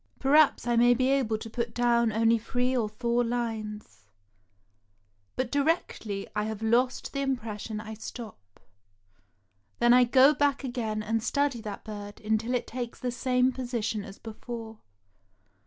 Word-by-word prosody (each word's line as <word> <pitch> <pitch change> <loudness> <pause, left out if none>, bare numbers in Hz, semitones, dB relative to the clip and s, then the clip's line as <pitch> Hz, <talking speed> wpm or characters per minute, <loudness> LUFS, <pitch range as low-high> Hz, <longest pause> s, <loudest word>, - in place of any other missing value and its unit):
Perhaps 290 0 +4
I 240 0 +1
may 240 +1 +6
be 255 +2 +1
able 250 -6 +1
to 225 - -8
put 230 0 -4
down 235 -1 +3
only 225 +1 +3
three 250 +3 -1
or 225 -4 0
four 235 +2 0
lines; 225 -3 -4 1.3
but 255 -2 -2
directly 280 - -1
I 210 0 0
have 220 0 -5
lost 245 +3 +1
the 275 - -2
impres 230 -6 -3
sion 215 0 -5
I 220 0 -7
stop. 215 - -10 1.2
Then 240 0 +5
I 250 0 +6
go 265 +4 +6
back 285 -2 +1
again 225 -4 -3
and 225 +1 0
study 280 0 0
that 210 -2 -7
bird 205 -1 -8
until 220 +3 0
it 245 - -1
takes 240 -1 -6
the 250 - -2
same 250 +1 +2
position 235 -5 -3
as 195 0 -10
before. 225 0 -8
235 Hz, 155 wpm, -28 LUFS, 220-250 Hz, 1.3 s, may